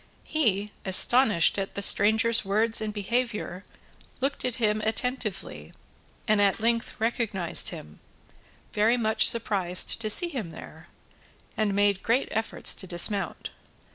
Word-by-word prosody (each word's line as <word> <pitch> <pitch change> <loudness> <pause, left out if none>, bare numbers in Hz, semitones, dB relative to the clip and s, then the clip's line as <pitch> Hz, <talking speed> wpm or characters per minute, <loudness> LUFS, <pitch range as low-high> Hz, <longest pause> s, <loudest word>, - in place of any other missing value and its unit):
He, 210 -9 -1
astonished 205 -1 +5
at 195 - -6
the 200 - -3
stranger's 220 +4 +3
words 220 +3 +1
and 215 -1 -4
behaviour, 210 -3 -4 0.6
looked 275 +2 -3
at 250 -2 -2
him 215 -2 -1
attentively, 220 -3 -4 0.5
and 215 -1 +2
at 200 +1 +1
length 230 +1 -2
recognised 220 -6 -1
him, 75 0 -12 0.7
very 220 +4 +1
much 220 -2 +2
surprised 195 -3 -1
to 215 - 0
see 345 +11 +3
him 250 - -6
there, - - -13 0.7
and 210 -2 -2
made 200 -1 0
great 240 +4 -1
efforts 220 +1 0
to 190 - -8
dismount. 180 +3 -1
215 Hz, 130 wpm, -25 LUFS, 200-230 Hz, 0.7 s, astonished